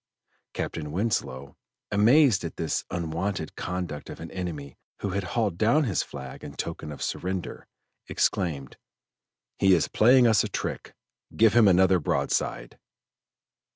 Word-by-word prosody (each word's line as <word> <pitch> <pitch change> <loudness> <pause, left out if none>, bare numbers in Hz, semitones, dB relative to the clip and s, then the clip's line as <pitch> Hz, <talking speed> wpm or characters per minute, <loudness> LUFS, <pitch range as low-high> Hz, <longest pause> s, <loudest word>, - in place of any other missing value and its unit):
Captain 75 -2 -4
Winslow, 70 - -2 0.4
amazed 115 +2 +4
at 85 - -5
this 80 - -2
unwonted 85 0 -3
conduct 90 -5 -5
of - - -8
an 80 - -8
enemy 80 -7 -6 0.3
who 100 - -2
had 100 +1 -2
hauled 100 -2 -1
down 120 +8 +3
his 110 -9 0
flag - - -9
in - - -8
token 75 - -5
of 75 - -6
surrender, 90 -1 -4 0.4
exclaimed: 70 -8 -1 0.8
"He 95 -1 +5
is 85 - +1
playing 125 +3 +5
us 110 -3 +4
a - - -3
trick, - - -5 0.4
give 110 -1 +5
him 115 -2 +6
another 95 0 +5
broadside." 75 - -2
95 Hz, 135 wpm, -26 LUFS, 80-105 Hz, 0.8 s, him